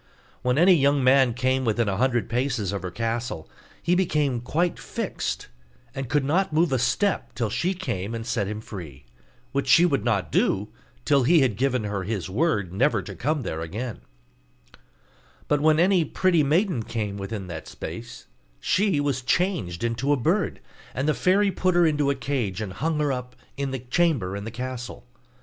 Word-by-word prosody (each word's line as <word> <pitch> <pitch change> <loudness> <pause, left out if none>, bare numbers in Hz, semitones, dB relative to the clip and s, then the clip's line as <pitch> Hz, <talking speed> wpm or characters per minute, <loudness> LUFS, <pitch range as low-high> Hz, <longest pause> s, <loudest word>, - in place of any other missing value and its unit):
When 125 +1 +1
any 180 +4 +7
young 140 -3 +3
man 130 -2 +4
came 130 +1 +1
within 115 -1 +1
a 95 -1 -1
hundred 120 -1 +1
paces 120 -4 -1
of 100 - -3
her 90 - -4
castle, 115 -4 -3 0.4
he 175 - +2
became 150 -9 +1
quite 165 +8 -1
fixed, - - -4 0.5
and 135 -2 -5
could 145 0 +1
not 185 +6 +1
move 160 0 +2
a 130 - +2
step 130 - 0
till 115 -4 -1
she 185 - 0
came 115 - -3
and 115 0 -5
set 115 -4 -1
him 105 +1 -4
free; 80 - -9 0.5
which 140 0 -1
she 155 +6 +6
would 140 -10 +1
not 105 -5 0
do 100 +2 +1 0.4
till 140 -2 +4
he 160 +5 +5
had 125 -6 +2
given 125 0 0
her 100 -2 -2
his 95 -1 -3
word 105 - 0
never 135 +10 +2
to - - -7
come 150 -2 -1
there 80 -5 -4
again: 105 +8 -5 1.5
but 145 -1 +2
when 155 +1 +4
any 180 0 +4
pretty 175 +2 +2
maiden 160 - +2
came 105 -2 -3
within 100 0 -5
that 85 -3 -7
space - - -8 0.3
she 190 - +1
was 140 -2 0
changed 130 - 0
into 120 +4 0
a 145 - +4
bird, 120 - 0 0.3
and 130 +4 -1
the 155 - +3
fairy 195 +5 +3
put 185 -1 0
her 175 -1 +5
into 150 -3 +2
a 140 - +1
cage, 125 -8 -2
and 105 -4 -4
hung 155 - -1
her 150 -2 +1
up 125 -1 -5 0.2
in 140 -1 -3
a 130 - -2
chamber 125 - 0
in 100 0 -5
the - - -4
castle. 125 +1 -6
130 Hz, 185 wpm, -25 LUFS, 110-150 Hz, 1.5 s, any